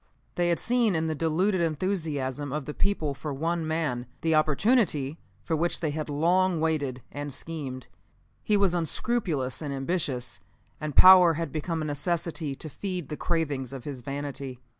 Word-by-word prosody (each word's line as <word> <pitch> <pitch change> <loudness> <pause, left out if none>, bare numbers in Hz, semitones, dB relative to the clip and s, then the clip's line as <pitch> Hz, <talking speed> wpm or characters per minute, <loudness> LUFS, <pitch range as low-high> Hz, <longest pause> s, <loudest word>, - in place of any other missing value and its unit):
They 175 0 +1
had 170 - +3
seen 235 -5 +2
in 160 0 +1
the 160 - 0
deluded 170 +5 +1
enthusiasm 155 -5 -1
of 150 -1 -3
the 150 - -5
people 160 -7 0
for 150 +2 -5
one 165 +3 -1
man, 150 -7 -1
the 165 0 +2
opportunity 155 - +2 0.2
for 165 - 0
which 170 +2 0
they 155 -3 -1
had 155 0 -4
long 175 +4 +2
waited 145 -6 -1
and 145 0 -5
schemed. 135 -4 -6 0.6
He 210 - +3
was 200 -3 +3
unscrupulous 165 - -1
and 145 -2 -4
ambitious, 135 - -2 0.4
and 150 -3 -4
power 185 -2 +9
had 165 -2 -3
become 160 +2 -2
a - - -3
necessity 155 0 -2
to 155 - -6
feed 180 0 -4
the 150 - -3
cravings 145 -6 -1
of 135 -3 -7
his 135 -3 -6
vanity. 140 -1 -5
155 Hz, 165 wpm, -27 LUFS, 140-175 Hz, 0.6 s, power